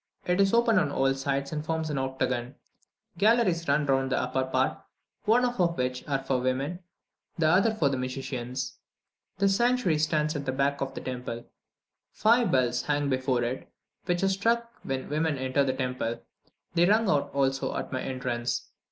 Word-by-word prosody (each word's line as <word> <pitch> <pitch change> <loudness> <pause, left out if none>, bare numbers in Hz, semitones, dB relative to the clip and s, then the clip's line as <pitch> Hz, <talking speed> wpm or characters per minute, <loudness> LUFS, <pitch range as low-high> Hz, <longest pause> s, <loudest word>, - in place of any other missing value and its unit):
It 180 +2 +2
is 195 0 +4
open 230 -3 +4
on 150 -5 0
all 135 -1 +2
sides, 140 0 -2
and 150 -1 -3
forms 160 -1 -2
an 140 - -1
octagon. 130 -1 -2 0.6
Galleries 205 -6 +3
run 145 +1 +2
round 135 -1 +1
the - - +2
upper 130 +1 0
part, 130 0 0 0.5
one 230 +4 +4
half 245 -1 -1
of 170 -1 +2
which 125 0 -2
are 140 -2 +1
for 135 -1 0
women, 135 +7 -1 0.6
the 165 - +1
other 190 +8 +4
for 155 -9 +2
the 135 -1 0
musicians. 130 0 -4 0.6
The 200 +1 +3
sanctuary 235 -5 +2
stands 155 0 +1
at 145 -1 -3
the 130 - -1
back 140 +1 0
of 135 0 -3
the - - -5
temple; 125 -2 -5 0.7
five 230 -2 +3
bells 125 -2 +2
hang 145 0 0
before 130 -2 +1
it, 125 +2 -4 0.3
which 175 +1 0
are 195 - +4
struck 230 +4 +1
when 135 -1 -3
women 155 0 0
enter 130 +2 +1
the 135 - +1
temple; 125 -3 -3 0.5
they 175 0 +4
rung 220 +2 +4
out 145 -5 +1
also 135 -1 0
at - - -4
my 130 -1 -2
entrance. 125 -2 -3
140 Hz, 180 wpm, -28 LUFS, 130-175 Hz, 0.7 s, is